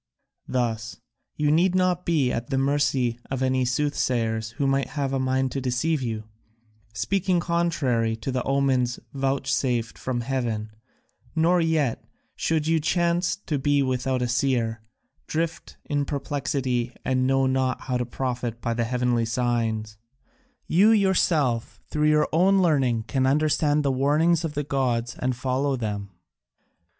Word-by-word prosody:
Thus 110 -3 -2 0.4
you 150 -1 +1
need 175 +4 +3
not 180 -1 +1
be 150 -7 +2
at 115 +1 -3
the 135 - 0
mercy 135 -3 +1
of 130 -1 -2
any 130 -1 +1
soothsayers 120 -5 0
who 140 - -1
might 135 0 +1
have 135 -1 -1
a 135 - +1
mind 130 0 0
to 135 - -3
deceive 135 +5 0
you, 110 -3 -3 0.7
speaking 175 - 0
contrary 155 -10 0
to 115 +4 -4
the 130 0 -1
omens 130 -3 +1
vouchsafed 135 -3 -1
from 125 -2 -2
heaven, 115 -4 -2 0.6
nor 170 +2 +3
yet, 155 -7 0 0.3
should 160 -2 0
you 165 0 +2
chance 170 +2 +1
to 150 -4 -1
be 145 +1 +2
without 130 0 -1
a - - 0
seer, 120 -3 0 0.5
drift 165 +1 -3
in 145 -1 -1
perplexity 135 -4 -2
and 130 0 +1
know 135 0 +3
not 130 0 0
how 125 -1 -2
to 125 - -1
profit 120 -2 -3
by 115 -1 -2
the 115 0 0
heavenly 120 -1 +1
signs: 115 -2 -1 0.7
you 195 +6 +4
yourself 170 - +2
through 150 0 +2
your 150 0 +3
own 190 +4 +4
learning 135 -10 +2
can 130 +3 0
understand 150 +1 +2
the 140 - +3
warnings 150 +6 +2
of 155 -2 -4
the 145 - -1
gods 125 -4 -1
and 130 0 0
follow 135 +2 0
them." 105 -4 -4
135 Hz, 145 wpm, -25 LUFS, 120-150 Hz, 0.7 s, you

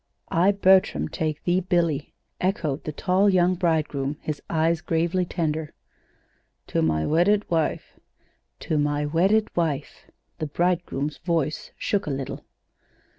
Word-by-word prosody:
"'I, 185 +5 +4
Bertram, 190 -1 +3
take 155 -3 -3
thee, 175 +1 +2
Billy,'" 170 -5 0 0.3
echoed 165 -7 -1
the 155 - -2
tall 185 +6 +2
young 180 -1 +3
bridegroom, 155 -5 0
his 150 -2 -4
eyes 165 0 +1
gravely 170 +3 0
tender. 160 -3 -2 1.0
"To - - +1
my 80 -1 +1
wedded 200 +6 +2
wife." 160 -2 -1 0.6
"'To 155 - 0
my 145 0 0
wedded 190 +8 +2
wife.'" 155 -5 -2 0.3
The 155 - -2
bridegroom's 170 -3 -1
voice 165 -4 -2
shook 200 -5 -1
a - - -1
little. 135 -1 -4
165 Hz, 125 wpm, -25 LUFS, 150-180 Hz, 1.0 s, I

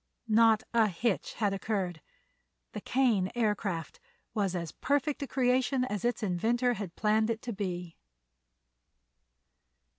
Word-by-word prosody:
Not 225 0 +5
a 225 -2 +5
hitch 200 +3 -1
had 205 -3 0
occurred. 190 -4 -2 0.7
The - - -6
Kane 225 -8 +2
Aircraft 210 - -1 0.3
was 200 -4 0
as 170 -3 -3
perfect 285 +1 0
a 280 - -3
creation 255 0 +2
as 210 -6 -4
its 240 -2 0
inventor 230 +7 +1
had 200 -6 -6
planned 220 +1 +2
it 230 0 -2
to 240 - -4
be. 180 -4 -4
215 Hz, 125 wpm, -30 LUFS, 190-240 Hz, 0.7 s, Not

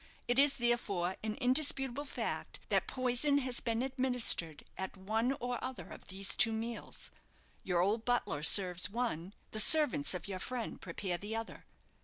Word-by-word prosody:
It 245 +2 +2
is, 285 0 +4
therefore, 200 -7 -1
an 215 -1 -4
indisputable 270 0 0
fact, 280 - -4
that - - +1
poison 255 +3 +1
has 255 -3 +1
bee 230 - -2
a 235 +3 -1
administered 250 - +1
at 190 +1 -6
one 220 +7 -1
or 245 -2 -4
other 255 0 -6
of - - -12
these 190 +1 -2
two 230 - +5
meals. 225 +1 -5 0.5
Your 175 -2 0
old 210 +5 0
butler 245 -12 -1
serves 180 +3 +4
one 205 -5 -3 0.2
the 215 - 0
servants 265 - +6
of 180 - -6
your 190 -2 -5
friend 245 +3 -5
prepare 175 0 -4
the 210 +4 -5
other. 225 0 -7
230 Hz, 165 wpm, -33 LUFS, 190-255 Hz, 0.5 s, servants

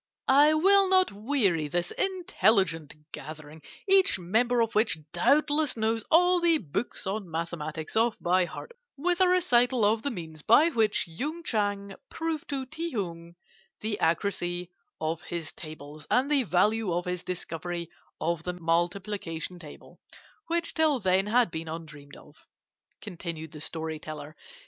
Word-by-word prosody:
"I 290 +3 +6
will 390 +4 +5
not 375 -1 +4
weary 200 - 0
this 175 +3 -2
intelligent 205 - +1 0.2
gathering, 155 0 -9 0.3
each 390 - +5
member 225 +7 +1
of 230 -1 0
which 215 -5 +3 0.2
doubtless 290 - +2
knows 225 0 0
all 355 +2 +5
the 335 -2 +4
books 200 - -4
on 195 -1 -3
mathematics 160 -1 -5
off 225 +1 +2
by 180 +1 +2
heart, 325 - -9 0.3
with 350 +5 0
a 370 - +6
recital 250 - +3
of 215 +2 +2
the 285 - -2
means 160 - -7
by 260 - +5
which 220 - +1
Yung 295 - -5
Chang 205 -6 -1 0.2
proved 325 -2 -4
to 275 -2 -2
Ti 330 +6 -5
Hung 170 -5 -5 0.5
the 215 -1 -2
accuracy 175 0 -1 0.3
of 160 +1 -2
his 170 -2 -6
tables 155 -1 -10
and 265 +4 +2
the 285 -2 +4
value 210 +2 +2
of 175 +1 -1
his 180 -1 -3
discovery 175 -1 -5 0.3
of 170 0 -1
the 180 +2 -4
multiplication 175 0 -2
table, 155 -4 -13 0.5
which 335 0 -1
till 315 -3 +3
then 190 -1 +2
had 235 -2 +3
been 160 0 -5
undreamt 155 -3 -9
of," - - -17 0.6
continued 170 -5 -6
the 150 - -10
story 160 0 -4
teller. 155 0 -8
195 Hz, 150 wpm, -28 LUFS, 165-265 Hz, 0.6 s, I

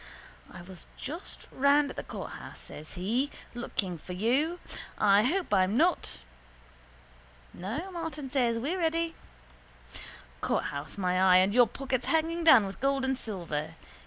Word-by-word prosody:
—I 175 - -10
was 180 -2 -11
just 320 +7 -7
round 280 +1 +3
at - - -10
the - - -3
courthouse, - - -8
says 155 +1 -9
he, 230 +10 0 0.2
looking 195 -7 -3
for 180 - -8
you. 270 - +1 0.4
I 205 -1 +5
hope 340 - 0
I'm 190 +4 +3
not... 330 - +1 1.3
—No, 195 +8 -4
says 380 0 -9
Martin, 270 -8 -1
we're 345 +7 -1
ready. 330 0 0 1.3
Courthouse 140 +5 -2
my 185 -1 +1
eye 185 -1 +7
and 190 +2 +4
your 245 0 +6
pockets 260 +1 -3
hanging 330 +1 +1
down 265 -10 +8
with 195 0 -7
gold 275 0 +1
and 265 0 +1
silver. 165 - -4
245 Hz, 140 wpm, -29 LUFS, 185-300 Hz, 1.3 s, down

